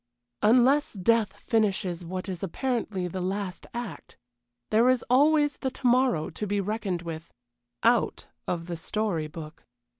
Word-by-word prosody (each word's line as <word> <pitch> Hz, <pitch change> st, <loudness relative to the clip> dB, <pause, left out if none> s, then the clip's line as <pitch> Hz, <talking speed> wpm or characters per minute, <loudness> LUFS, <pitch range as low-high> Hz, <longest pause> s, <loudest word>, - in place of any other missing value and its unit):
Unless 255 Hz, +7 st, +4 dB
death 220 Hz, +2 st, +2 dB
finishes 190 Hz, -6 st, 0 dB
what 185 Hz, +2 st, -5 dB
is 185 Hz, -3 st, -5 dB
apparently 210 Hz, -2 st, -2 dB
the 185 Hz, +1 st, -4 dB
last 190 Hz, 0 st, -3 dB
act, 240 Hz, -3 st, -7 dB, 0.5 s
there 230 Hz, +4 st, +5 dB
is 255 Hz, -2 st, +2 dB
always 295 Hz, +2 st, +4 dB
the 265 Hz, -, -2 dB
to 260 Hz, -, -11 dB
morrow 245 Hz, -10 st, +3 dB
to 210 Hz, -, -4 dB
be 205 Hz, +1 st, 0 dB
reckoned 200 Hz, -3 st, -2 dB
with 165 Hz, -1 st, -6 dB, 0.5 s
out 235 Hz, 0 st, +2 dB, 0.2 s
of 170 Hz, -1 st, -2 dB
the 170 Hz, -1 st, -5 dB
story 175 Hz, -3 st, -1 dB
book. 155 Hz, 0 st, -10 dB
205 Hz, 145 wpm, -27 LUFS, 180-240 Hz, 0.5 s, there